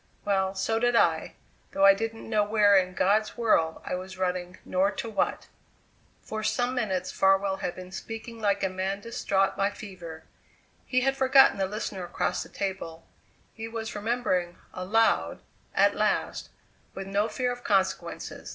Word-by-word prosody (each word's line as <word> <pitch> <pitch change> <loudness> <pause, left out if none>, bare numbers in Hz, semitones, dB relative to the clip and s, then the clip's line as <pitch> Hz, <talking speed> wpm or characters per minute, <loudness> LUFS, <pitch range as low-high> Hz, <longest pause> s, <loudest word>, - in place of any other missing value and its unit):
Well, 190 -1 +1
so 225 +4 0
did 245 0 +2
I, - - +2 0.4
though 290 +1 +4
I 295 - +9
didn't 225 -3 -5
know 215 -2 +2
where 205 -1 +4
in 185 -1 +2
God's 215 +5 +2
world 165 -9 +2
I - - -3
was 185 +1 -5
running, 180 -1 -2
nor 190 +2 +2
to 220 - -5
what." - - -1 0.8
For 220 0 -5
some 245 +3 0
minutes 210 -8 -1
Farwell 195 0 +2
had 180 - -4
been 185 0 -10
speaking 225 +3 -7
like 200 -1 +1
a - - +3
man 190 +2 -3
distraught 195 -3 0
by 195 0 +1
fever. 180 -7 -9 0.6
He 255 0 +2
had 270 +1 +1
forgotten 265 -5 +5
the 190 - +1
listener 200 -2 -4
across 175 - -2
the - - -8
table; 190 -4 -5 0.5
he 225 0 -6
was 225 -1 -5
remembering 205 -6 -1 0.2
aloud 215 +5 +1 0.3
at - - +4
last, - - -1 0.5
with 195 - -5
no 200 +2 0
fear 250 0 -1
of 245 0 -7
consequences. 190 -2 -1
200 Hz, 160 wpm, -27 LUFS, 185-225 Hz, 0.8 s, I